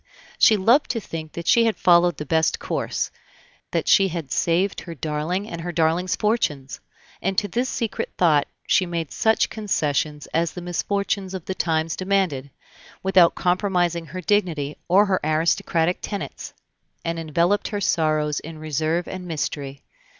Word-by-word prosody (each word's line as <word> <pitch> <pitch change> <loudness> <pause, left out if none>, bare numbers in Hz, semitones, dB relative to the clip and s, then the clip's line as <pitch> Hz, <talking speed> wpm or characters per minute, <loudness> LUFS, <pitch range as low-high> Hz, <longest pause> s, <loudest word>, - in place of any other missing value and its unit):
She 215 - +6
loved 235 +9 +3
to 235 - -1
think 160 -6 -7
that 170 - -6
she 235 -1 +5
had 225 - +1
followed 175 -2 +4
the 150 - -5
best 160 +2 +2
course, - - -2 0.6
that - - -1
she 195 -1 +5
had 165 -6 -5
saved 180 +4 +1
her 170 -2 -8
darling 155 +7 -2
and 170 -5 -6
her 175 +1 -4
darling's 170 +2 +1
fortunes; 150 - -1 0.4
and 195 +1 -1
to 205 - +2
this 245 +7 -1
secret 230 -2 -3
thought 155 -5 +3 0.2
she 185 - +2
made 165 -3 -3
such 220 0 +2
concessions 150 -8 -1
as 165 -1 +1
the - - -6
misfortunes 190 +2 -2
of 185 - -7
the 190 - -3
times 160 -3 0
demanded, 185 -8 0 0.5
without 185 -3 +5
compromising 175 -2 0
her 185 +2 -6
dignity 165 -7 0
or 195 +4 +5
her 190 -2 +1
aristocratic 160 +2 +1
tenets, 200 -2 -6 0.5
and 165 0 -2
enveloped 170 +5 +1
her 205 - -3
sorrows 155 -5 +1
in 160 0 -9
reserve 155 +3 -1
and 185 -1 -6
mystery. 145 -4 -4
170 Hz, 155 wpm, -23 LUFS, 155-190 Hz, 0.6 s, She